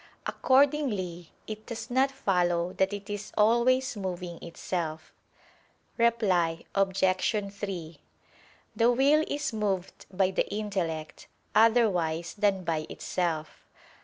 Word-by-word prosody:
Accordingly 255 - +1 0.2
it 215 0 -8
does 235 +1 -6
not 265 +2 +3
follow 180 -8 0
that 190 +1 +1
it 205 -1 -6
is 205 0 -5
always 240 +4 +3
moving 180 -3 -5
itself. 165 -2 -4 0.8
Reply 190 -8 +2
Obj. 195 -1 +1 0.5
3: 185 -5 -6 0.8
The 230 +2 +4
will 280 +5 +4
is 290 -4 -2
moved 195 -4 -2
by 190 0 +2
the - - 0
intellect, 185 -7 -3 0.3
otherwise 180 -8 +3
than 200 -3 +1
by 160 -2 -2
itself. 160 -4 -3
195 Hz, 105 wpm, -28 LUFS, 175-230 Hz, 0.8 s, The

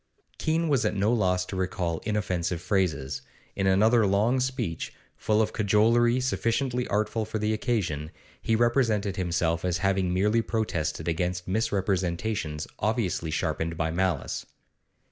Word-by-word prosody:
Keene 165 +1 +1
was 140 -5 +2
at - - 0
no 105 +4 +2
loss 90 -5 +1
to 95 - -6
recall 90 -3 -1
inoffensive 90 -5 -1
phrases; 90 -7 -1 0.3
in 95 -1 0
another 110 +3 +4
long 105 +7 +2
speech, 125 - -2 0.2
full 110 0 +2
of - - -3
cajolery 115 +4 +3
sufficiently 125 0 0
artful 110 +2 0
for 110 +1 -4
the 105 +1 0
occasion, 90 - -1 0.3
he 115 - +1
represented 115 -4 +2
himself 85 -2 0
as 90 -1 0
having 95 -1 +1
merely 105 +5 +2
protested 85 -9 -2
against 90 +2 -1
misrepresentations 95 -5 -1
obviously 105 -6 0
sharpened 80 +1 -2
by 80 0 0
malice. 90 -3 -1
100 Hz, 135 wpm, -27 LUFS, 90-110 Hz, 0.3 s, another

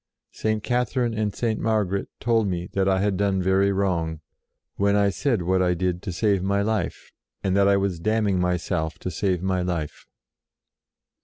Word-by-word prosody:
" - - -60
St. 110 -1 -2
Catherine 125 -1 0
and 110 -1 -1
St. 115 -3 -1
Margaret 105 -3 0
told 115 -2 +2
me 90 -1 -2
that 95 0 +2
I 95 0 +2
had 100 -2 +1
done 100 -1 +1
very 95 +2 +2
wrong, 85 -5 -1 0.5
when 100 0 +2
I 100 -1 +3
said 115 -3 0
what 95 +2 +2
I 90 -1 +2
did 90 0 -1
to - - -4
save 100 +1 +1
my 100 +2 +1
life, 110 0 -2 0.3
and 95 -1 +1
that 100 0 +4
I 100 0 +4
was 95 -3 -1
damning 105 0 +1
myself 90 -3 -1
to 90 - -5
save 90 +1 -1
my 95 -1 0
life." 85 -4 -4
95 Hz, 180 wpm, -24 LUFS, 90-105 Hz, 0.5 s, that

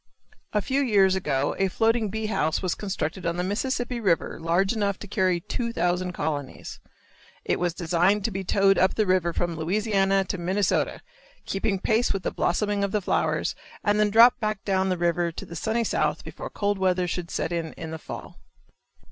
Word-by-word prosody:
A 210 -2 0
few 270 +2 +1
years 200 -7 +4
ago 145 -7 0
a 195 - +3
floating 225 +2 +1
bee 220 +2 -3
house 160 -7 0
was 185 - +1
constructed 190 -3 -4
on 170 +1 -1
the 180 - 0
Mississippi 245 +5 -2
river 190 -7 0
large 175 +5 +1
enough 200 -3 0
to 205 - -9
carry 185 -3 +1
two 235 +6 -3
thousand 180 -3 0
colonies. 145 -4 -4 0.7
It - - 0
was 175 -1 -1
designed 180 +4 +2
to 225 - 0
be 190 0 -3
towed 195 +1 +3
up 185 - +3
the 215 - +2
river 185 -2 +2
from 170 0 -2
Louisiana 195 +3 +1
to 185 - -4
Minnesota, 190 +3 0 0.4
keeping 195 0 -1
pace 220 +5 +1
with 195 -2 -4
the - - -1
blossoming 205 +2 0
of 200 - -1
the 210 - +2
flowers - - 0 0.3
and 205 -1 +2
then 210 0 +3
drop 230 +4 +7
back 215 -2 -2
down 190 -1 +1
the 185 - 0
river 170 0 +1
to - - -7
the 170 - -9
sunny 220 +7 0
South - - 0
before - - -7
cold 205 -1 -1
weather 185 -1 +1
should 175 -1 -4
set - - -2
in 165 -2 -3
in 160 -1 -7
the 160 - -5
fall. - - -9
190 Hz, 195 wpm, -25 LUFS, 175-210 Hz, 0.7 s, drop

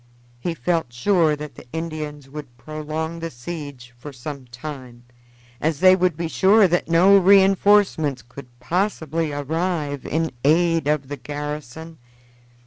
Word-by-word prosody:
He 170 +6 -3
felt 165 -7 -1
sure 160 +5 +2
that 150 -1 -8
the - - -14
Indians 155 -3 -5
would 135 -4 -10
prolong 155 +4 -5
the 165 0 -4
siege 135 -2 -8
for 145 +4 -9
some 135 +1 -8
time, 125 -1 -9 0.6
as 155 -1 0
they 185 +1 +7
would 180 -4 0
be 170 0 -2
sure 195 +5 +4
that 175 -1 -1
no 180 +4 +6
re 195 +1 +6
enforcements 190 - +2
could 125 +2 -12
possibly 165 0 -1
arrive 150 0 -2
in 160 +1 -1
aid 165 +1 +3
of 150 -2 0
the 145 +1 -6
garrison. 150 +3 -7
155 Hz, 140 wpm, -22 LUFS, 140-170 Hz, 0.6 s, they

